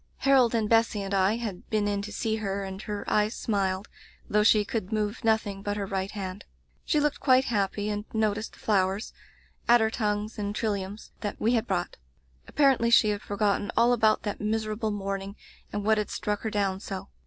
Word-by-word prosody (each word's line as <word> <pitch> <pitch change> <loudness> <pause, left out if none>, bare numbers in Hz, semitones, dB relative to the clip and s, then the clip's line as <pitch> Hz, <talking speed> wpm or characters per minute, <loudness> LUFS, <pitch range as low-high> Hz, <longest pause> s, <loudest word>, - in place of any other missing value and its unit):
Harold 260 -4 +4
and 220 -2 +1
Bessy 225 -2 +2
and 195 0 -4
I 195 +2 +3
had 220 -6 -6
been 210 -1 +1
in 200 -1 0
to 210 +1 -7
see 220 +1 -1
her, 200 -2 -2
and 190 0 -6
her 210 -1 -5
eyes 210 +1 +1
smiled, 195 -2 -1 0.4
though 210 - +2
she 210 -1 +5
could 215 -3 -3
move 215 +2 -2
nothing 220 -3 +1
but 205 0 -2
her 200 - -2
right 195 0 -2
hand. 195 -1 -6 0.4
She 300 - +1
looked 295 0 0
quite 260 -1 +4
happy, 205 -2 -1
and 210 0 -3
no 220 -2 +1
ticed 215 +2 -6
the - - -16
flowers 195 0 0 0.3
— - - -30
^adder 230 -2 +5
tongues 210 -1 -2
and 205 0 -3
tril 220 0 0
liums 200 +2 -6
— - - -36
that 205 - -4
we 230 +3 +2
had 230 0 +1
brought. 175 -2 -2 0.5
Apparendy 265 -5 +3
she 220 -2 +6
had 205 0 -1
forgotten 205 0 0
all 235 +1 +5
about 220 -2 +3
that 205 - -4
miserable 215 +1 -1
morn 195 -1 -3
ing 200 +1 -8 0.4
and 205 -1 -3
what 220 0 +4
had 210 - -2
struck 210 -1 -2
her 220 - -2
down 200 -3 0
so. 195 0 -6
210 Hz, 210 wpm, -27 LUFS, 200-220 Hz, 0.5 s, she